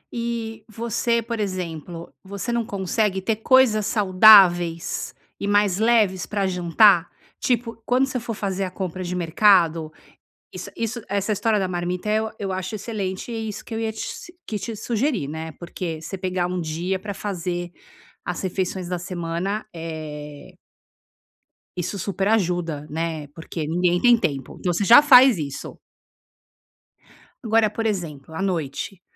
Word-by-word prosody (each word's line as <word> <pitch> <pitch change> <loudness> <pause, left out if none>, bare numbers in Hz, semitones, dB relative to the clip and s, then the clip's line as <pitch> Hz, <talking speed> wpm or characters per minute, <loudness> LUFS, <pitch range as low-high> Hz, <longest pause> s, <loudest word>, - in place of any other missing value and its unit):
E 230 -2 -4
você, 230 +1 -1
por 230 -1 -4
exemplo, 175 -4 -5
você 200 +4 -5
não 235 0 0
consegue 200 0 -1
ter 210 +3 -1
coisas 225 -3 +4
saudáveis 185 -5 +5 0.2
e 200 - -3
mais 205 -2 +2
leves 215 -5 +2
pra 200 -2 -1
jantar? 180 0 +4 0.3
Tipo, 230 -2 -1
quando 255 +3 +2
você 260 -1 -3
for 230 -1 -5
fazer 195 -2 -2
a - - -4
compra 185 0 -5
de 180 +1 -4
mercado, 170 -2 +3 0.6
isso - - -7
isso 230 +1 -3
essa 200 +2 -1
história 215 0 +1
da 190 - -1
marmita, 180 +2 -3
eh, 215 - +2
eu 220 0 -3
eu 195 -2 -3
acho 185 +3 -4
excelente 200 -1 -4
e 225 -1 -4
isso 210 - -7
que - - -11
eu - - -2
ia 220 -1 -1
te 220 - -12
s 345 - -7
que 215 - -3
te 230 +2 -5
sugerir, 225 - -1
né, 160 +1 -6
porque 170 0 -6
você 190 +3 -6
pegar 185 -1 -1
dia 170 +4 -2
pra 200 +1 -6
fazer 175 -3 -4 0.5
as 180 +1 -4
refeições 185 -1 -2
da 180 -1 -2
semana, 175 +3 -3
eh 150 -3 -8 1.2
isso 180 +3 -3
super 195 +1 -2
ajuda, 175 -8 0
né, 160 -1 -3
porque 165 -1 -5
ninguém 175 +1 +1
tem 245 -1 +6
tempo. 140 - -3
Então, 180 - 0
você 200 +4 0
já 240 +6 +9
faz 260 - +7
isso. 140 -2 -6 1.7
Agora 220 -1 +3
por 225 +2 -4
exemplo, 160 -8 -3
à 160 - -4
noite, 175 0 -3
190 Hz, 155 wpm, -23 LUFS, 175-220 Hz, 1.7 s, já